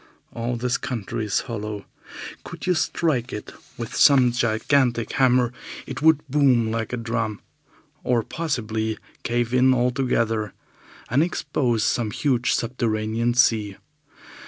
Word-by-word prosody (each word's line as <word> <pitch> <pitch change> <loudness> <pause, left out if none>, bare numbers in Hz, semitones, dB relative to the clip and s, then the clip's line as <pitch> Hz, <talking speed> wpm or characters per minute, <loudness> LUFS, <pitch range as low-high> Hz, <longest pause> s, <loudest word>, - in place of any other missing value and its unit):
All 120 +1 -2
this 125 +1 -1
country 115 -1 -4
is 105 - 0
hollow. 105 -4 -5 0.6
Could - - -8
you 185 - +3
strike 155 -6 0
it 105 - -7 0.2
with 115 -2 -6
some 130 -4 +6
gigantic 120 +1 +1
hammer 125 -2 +3 0.3
it - - -6
would 160 -1 +4
boom 130 -5 +3
like 115 -1 -2
a 125 - -2
drum, 115 -2 -2 0.6
or 120 -2 +1
possibly 110 -9 -2 0.2
cave 120 0 -1
in 130 +1 +5
altogether 120 -4 0 0.6
and 135 +4 +4
expose 140 -9 0
some 115 0 0
huge 125 +1 +1
subterranean 115 -1 -1
sea. 110 -5 +2
120 Hz, 125 wpm, -23 LUFS, 110-130 Hz, 0.6 s, some